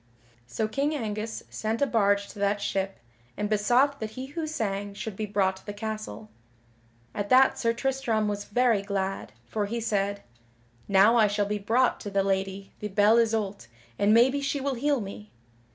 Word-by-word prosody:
So 215 - -2
King 285 +6 -1
Angus 220 -3 -4
sent 220 +1 -2
a 280 - +3
barge 200 -5 +2
to - - -11
that 200 +1 +1
ship, 195 -1 -2 0.4
and 210 - -1
besought 245 +7 +2
that 220 - -4
he 255 +4 -7
who 310 +4 -4
sang 205 -8 -3
should 215 0 -5
be 215 +1 -3
brought 195 -2 +1
to - - -18
the 205 - -4
castle. 215 0 -6 0.8
At 205 0 -3
that 260 +1 +5
Sir 230 - +2
Tristram 240 -3 0
was 205 0 -3
very 235 -1 +2
glad, 195 - -3
for 205 - -2
he 235 +3 -3
said: 200 -2 -1 0.6
"Now 200 +4 +5
I 220 -2 +5
shall 205 0 0
be 210 +1 -2
brought 235 +5 +2
to 205 - -6
the 195 -1 +1
Lady 195 0 -2
the 210 - -3
Belle 210 +3 +4
Isoult 215 - -1 0.3
and 205 +1 +4
maybe 255 +5 +4
she 280 +1 -1
will 275 0 -1
heal 280 +1 0
me." 205 +1 -8
215 Hz, 185 wpm, -27 LUFS, 200-235 Hz, 0.8 s, that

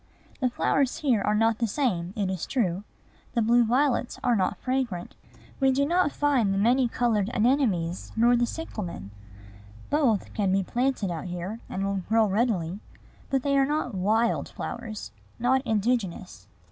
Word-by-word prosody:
The 255 -2 +1
flowers 270 +2 +1
here 255 -8 +2
are 210 - +1
not 225 +1 +2
the 230 - +1
same, 195 - -1
it 200 -2 0
is 185 -4 -4
true. 195 -7 0 0.5
The 235 - +3
blue 235 +2 +4
violets 250 +2 +1
are 245 -1 +3
not 190 -3 0
fragrant. 255 -9 -2 0.5
We 270 -1 +4
do 280 +2 +2
not 345 0 +2
find 275 -10 +1
the 195 - 0
many 245 +5 +3
colored 225 -4 0
anemones, 210 -9 +1
nor 235 +2 +4
the 240 0 +2
cyclamen. 185 - -6 0.8
Both 265 -9 +1
can 200 -3 0
be 195 0 +2
planted 240 -2 -1
out 165 0 -5
here, 180 +5 -5
and 195 +1 -2
will 195 -1 -1
grow 225 0 +4
readily; 200 -4 0 0.5
but 270 -2 0
they 280 -1 +1
are 275 -1 +4
not 295 -5 -1
wild 215 +5 +1
flowers, 220 - -6 0.3
not 255 +3 +2
indigenous. 205 - -1
230 Hz, 160 wpm, -26 LUFS, 195-255 Hz, 0.8 s, blue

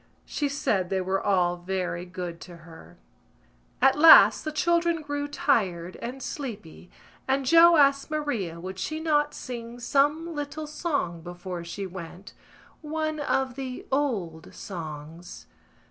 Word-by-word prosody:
She 290 -2 -2
said 200 -10 -1
they 190 - 0
were 190 +1 -1
all 180 -3 +1
very 180 -1 -3
good 175 -2 -6
to 175 -1 -10
her. 165 -1 -14 0.9
At 270 +2 +5
last 325 +1 +8
the 310 - -3
children 340 +1 +1
grew 290 0 -3
tired 190 - 0
and 255 +3 -7
sleepy 210 - -7 0.4
and 270 0 +1
Joe 335 +4 +7
asked 275 0 +3
Maria 240 - -3
would 185 +2 -7
she 310 +10 -3
not 295 -2 +1
sing 235 -1 -7
some 290 +7 +1
little 295 +1 -5
song 290 - -3
before 175 +1 -7
she 185 +4 -6
went, 185 +1 -9 0.5
one 310 0 -3
of 265 -3 0
the 260 -1 -6
old 205 - -2
songs. 165 -1 -8
245 Hz, 135 wpm, -26 LUFS, 180-295 Hz, 0.9 s, last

